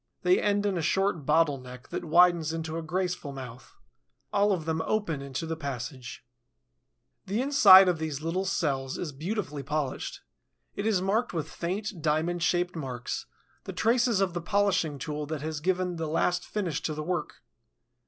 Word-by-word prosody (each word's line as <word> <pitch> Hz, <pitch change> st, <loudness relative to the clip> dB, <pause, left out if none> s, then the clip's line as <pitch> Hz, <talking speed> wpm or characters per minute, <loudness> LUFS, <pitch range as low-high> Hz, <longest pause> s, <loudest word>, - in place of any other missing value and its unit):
They 180 Hz, 0 st, +4 dB
end 205 Hz, 0 st, +1 dB
in 195 Hz, -4 st, 0 dB
a -, -, -1 dB
short 175 Hz, -2 st, 0 dB
bottle 150 Hz, -2 st, +3 dB
neck 125 Hz, 0 st, -11 dB
that -, -, -4 dB
widens 170 Hz, -1 st, +4 dB
into 160 Hz, -1 st, -4 dB
a 165 Hz, -, -2 dB
graceful 180 Hz, -2 st, -2 dB
mouth. 130 Hz, -2 st, -10 dB, 0.6 s
All 205 Hz, 0 st, +3 dB
of 175 Hz, -5 st, -1 dB
them 160 Hz, 0 st, -1 dB
open 165 Hz, -5 st, -1 dB
into 140 Hz, +3 st, -4 dB
the 165 Hz, 0 st, -3 dB
passage. 135 Hz, -5 st, -6 dB, 1.0 s
The 200 Hz, +4 st, -1 dB
inside 215 Hz, -9 st, +8 dB
of 175 Hz, -3 st, +1 dB
these 155 Hz, -3 st, -3 dB
little 165 Hz, +5 st, -2 dB
cells 135 Hz, -8 st, -1 dB
is 165 Hz, -, -4 dB
beautifully 155 Hz, 0 st, -4 dB
polished. 140 Hz, 0 st, -3 dB, 0.5 s
It 200 Hz, -, -2 dB
is 195 Hz, -4 st, +2 dB
marked 215 Hz, +4 st, 0 dB
with 160 Hz, -3 st, -2 dB
faint, 190 Hz, +1 st, -4 dB
diamond 160 Hz, +3 st, 0 dB
shaped 175 Hz, +1 st, +1 dB
marks, 130 Hz, -6 st, -4 dB, 0.4 s
the -, -, -6 dB
traces 235 Hz, -2 st, +2 dB
of 190 Hz, -3 st, +1 dB
the 175 Hz, -, -3 dB
polishing 185 Hz, -5 st, +1 dB
tool 150 Hz, +2 st, -4 dB
that 155 Hz, -1 st, -4 dB
has 155 Hz, -1 st, -3 dB
given 180 Hz, +1 st, 0 dB
the 165 Hz, -1 st, -2 dB
last 175 Hz, +3 st, 0 dB
finish 180 Hz, -8 st, -2 dB
to 155 Hz, -, -2 dB
the 155 Hz, -, -4 dB
work. 175 Hz, -5 st, -3 dB
165 Hz, 175 wpm, -28 LUFS, 150-190 Hz, 1.0 s, inside